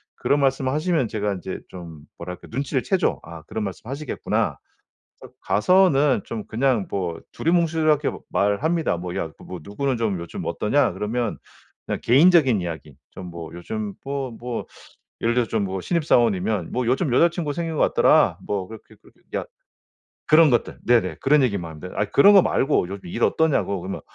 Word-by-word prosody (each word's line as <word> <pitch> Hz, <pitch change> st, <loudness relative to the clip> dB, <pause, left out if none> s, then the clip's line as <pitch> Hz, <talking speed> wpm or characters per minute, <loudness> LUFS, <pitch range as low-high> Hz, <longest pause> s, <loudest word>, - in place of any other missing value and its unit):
그런 145 Hz, -, +1 dB
말씀을 135 Hz, -1 st, +1 dB
하시면 155 Hz, -2 st, 0 dB
제가 105 Hz, -1 st, -1 dB
인제 95 Hz, 0 st, -6 dB
좀 85 Hz, -4 st, -10 dB, 0.2 s
뭐랄까 90 Hz, +1 st, -8 dB
눈치를 135 Hz, +2 st, -1 dB
채죠. 190 Hz, -3 st, 0 dB
아 85 Hz, -1 st, -10 dB
그런 110 Hz, +7 st, -5 dB
말씀 100 Hz, +4 st, -7 dB
하시겠구나. 140 Hz, +1 st, -2 dB, 0.6 s
그래서 -, -, -14 dB
가서는 145 Hz, -, +3 dB
좀 110 Hz, -2 st, -6 dB
그냥 120 Hz, -3 st, 0 dB
뭐 90 Hz, -4 st, -3 dB
두루뭉술하게 160 Hz, -3 st, +1 dB
뭐 -, -, -8 dB
말합니다. 145 Hz, -, +1 dB
뭐 90 Hz, +1 st, -6 dB
"야 80 Hz, -, -3 dB
뭐 90 Hz, -, -8 dB
누구는 130 Hz, -, -2 dB
좀 110 Hz, -5 st, -1 dB
요즘 85 Hz, 0 st, -7 dB
어떠냐?" -, -, +1 dB
그러면 115 Hz, +2 st, -2 dB, 0.5 s
그냥 -, -, -2 dB
개인적인 135 Hz, -, +5 dB
이야기 80 Hz, -5 st, -7 dB, 0.2 s
좀 95 Hz, -, -9 dB
뭐 85 Hz, -1 st, -8 dB
요즘 105 Hz, +4 st, -5 dB
뭐, 135 Hz, -1 st, -3 dB
뭐 120 Hz, +1 st, -5 dB, 0.6 s
예를 115 Hz, +1 st, +2 dB
들어서 120 Hz, -2 st, +1 dB
좀 110 Hz, -3 st, 0 dB
뭐 95 Hz, 0 st, -3 dB
신입사원이면 110 Hz, -, +1 dB
뭐 125 Hz, 0 st, -1 dB
"요즘 130 Hz, +4 st, +1 dB
여자친구 170 Hz, 0 st, +2 dB
생긴 165 Hz, 0 st, -3 dB
것 -, -, -1 dB
같더라." -, -, +4 dB
뭐 100 Hz, -2 st, -2 dB
그렇게, 110 Hz, -1 st, -13 dB
그렇게 -, -, -23 dB, 0.2 s
"야" -, -, -2 dB, 0.8 s
그런 155 Hz, 0 st, +6 dB
것들 120 Hz, -, 0 dB
네네 95 Hz, -9 st, +2 dB
그런 145 Hz, +1 st, +4 dB
얘기만 100 Hz, -9 st, -1 dB
합니다. 80 Hz, +4 st, -9 dB
아 100 Hz, -, +1 dB
그런 200 Hz, -, +6 dB
것 195 Hz, -, +8 dB
말고 135 Hz, -9 st, +1 dB
요즘 100 Hz, 0 st, -8 dB
일 115 Hz, +7 st, -3 dB
어떠냐고 150 Hz, -11 st, +1 dB
그러면 95 Hz, +2 st, -5 dB
115 Hz, 365 characters per minute, -23 LUFS, 95-145 Hz, 0.8 s, 것